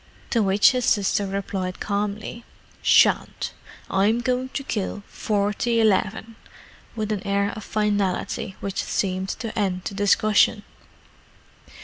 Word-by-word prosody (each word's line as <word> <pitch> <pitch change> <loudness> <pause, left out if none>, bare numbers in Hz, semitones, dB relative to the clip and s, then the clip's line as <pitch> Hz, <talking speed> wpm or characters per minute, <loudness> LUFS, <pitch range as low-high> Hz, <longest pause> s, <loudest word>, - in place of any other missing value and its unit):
To 230 - +3
which 200 0 +5
his 250 -1 -1
sister 205 -1 +2
replied 190 -1 -3
calmly, 205 +3 -3 0.4
"Shan't: - - +3 0.3
I'm 205 +4 +2
going 255 +1 -1
to 275 - -4
kill 205 -4 -3
forty 210 +3 0
'leven," 220 +2 0 0.6
with 215 -1 -2
an 205 -3 -1
air 200 +1 0
of 215 - -7
finality 205 0 -1
which 195 -1 -2
seemed 190 -1 -1
to 220 +2 -5
end 185 -3 -1
the - - -5
discussion. 205 +1 +3
205 Hz, 120 wpm, -24 LUFS, 195-220 Hz, 0.6 s, which